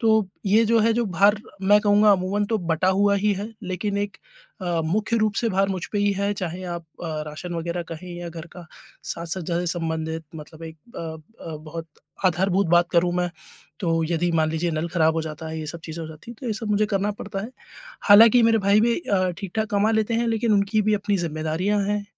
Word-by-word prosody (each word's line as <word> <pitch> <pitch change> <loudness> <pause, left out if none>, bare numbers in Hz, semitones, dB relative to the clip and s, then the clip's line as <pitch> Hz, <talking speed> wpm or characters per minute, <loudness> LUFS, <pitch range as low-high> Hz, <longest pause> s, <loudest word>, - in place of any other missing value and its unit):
तो 220 -4 +3 0.2
ये 215 +4 +5
जो 230 +1 +4
है 225 +1 +3
जो 240 +1 +1
भार 200 +3 +4 0.3
मैं 205 +2 +6
कहूँगा 210 0 +5
अमूमन 195 +2 0
तो 220 +1 0
बँटा 170 0 0
हुआ 200 +2 +3
ही 205 +1 +2
है, 205 +4 -6
लेकिन 190 +2 -3
एक 205 0 -3 0.5
अ, 175 -2 0
मुख्य 210 +7 0
रूप 215 -1 +1
से 230 - +2
भार 195 0 +2
मुझ 185 -3 -3
पे 205 - 0
ही 205 0 +2
है 200 +1 0
चाहे 185 -2 -4
आप 170 -1 -4 0.2
अ, 155 -2 -3
राशन 170 +4 -6
वगैरह 170 +1 -3
कहें 165 +3 -8
या 175 0 -6
घर 165 -1 -8
का 175 -2 -11 0.4
साज-सज्जा 170 0 -3
से 180 - -3
संबंधित 160 0 -3
मतलब 155 +1 -11
एक 160 0 -9 0.2
अ - - -4 0.5
अ, 155 - -5
बहुत 160 +2 -8 0.4
आधारभूत 190 +2 +2
बात 175 +1 +4
करूँ 175 0 +3
मैं, 180 0 0 0.5
तो 165 -3 +1
यदि 175 +1 +1
मान 160 -1 +2
लीजिए 160 +2 -1
नल 160 +2 -2
खराब 160 -2 +2
हो 165 - 0
जाता 160 0 -6
है 160 0 -5
ये 155 - -5
सब 170 +2 -6
चीज़ें 165 +1 -6
हो 160 - -6
जाती 160 +8 -11
हैं, 235 - -10
तो 260 - -6
ये 225 - 0
सब 215 +1 -5
मुझे 210 +1 +2
करना 200 0 0
पड़ता 200 -1 -6
है। 220 +5 -6 0.6
हालाँकि, 225 +4 +8
मेरे 225 0 +4
भाई 200 +1 +4
भी 235 +1 +2
अ, 185 - +1
ठीक-ठाक 210 +2 -3
कमा 205 +1 +2
लेते 220 +1 +1
हैं 235 +1 +1
लेकिन 225 0 +1
उनकी 205 +1 +2
भी 215 +1 +2
अपनी 205 0 0
ज़िम्मेदारियाँ 165 +5 -1
हैं, 205 0 -1
190 Hz, 225 wpm, -24 LUFS, 165-210 Hz, 0.6 s, हालाँकि